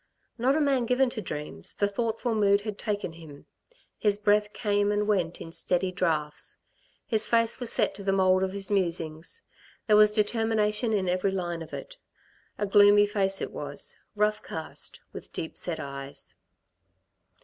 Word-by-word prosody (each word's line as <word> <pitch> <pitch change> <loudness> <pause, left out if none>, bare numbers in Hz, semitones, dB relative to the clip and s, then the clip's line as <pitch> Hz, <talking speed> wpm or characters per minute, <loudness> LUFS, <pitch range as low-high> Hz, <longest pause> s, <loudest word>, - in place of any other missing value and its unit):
Not 260 +4 +3
a - - +2
man 270 -5 +2
given 250 +1 +2
to 220 - -3
dreams, 150 - -5
the 205 - +1
thoughtful 225 +3 -2
mood 200 -2 +3
had 210 -1 -6
taken 205 -6 -2
him; 160 -4 -13 0.5
his 205 -2 +2
breath 210 0 +2
came 205 -2 +1
and 210 0 0
went 180 -5 0
in 165 - -8
steady 180 +2 -1
draughts. 160 -5 -1 0.5
His 220 -1 +3
face 230 -1 +2
was 245 -2 +2
set - - +2
to 200 - -9
the 195 - +1
mould 185 -1 +3
of 190 0 0
his 200 +1 -4
musing; 165 -5 0 0.6
there 210 - +4
was 210 0 +7
determination 220 +1 +1
in 195 -4 0
every 180 +2 +1
line 175 -3 -3
of 160 - -9
it. - - -8 0.6
A 205 - -1
gloomy 205 +1 +6
face 195 -2 0
it - - -3
was, - - -4 0.2
rough 210 0 +1
cast, 160 -1 -5
with - - -9
deep 160 - -4
set 165 -3 -3
eyes. 140 -1 -6
205 Hz, 170 wpm, -27 LUFS, 180-215 Hz, 0.6 s, was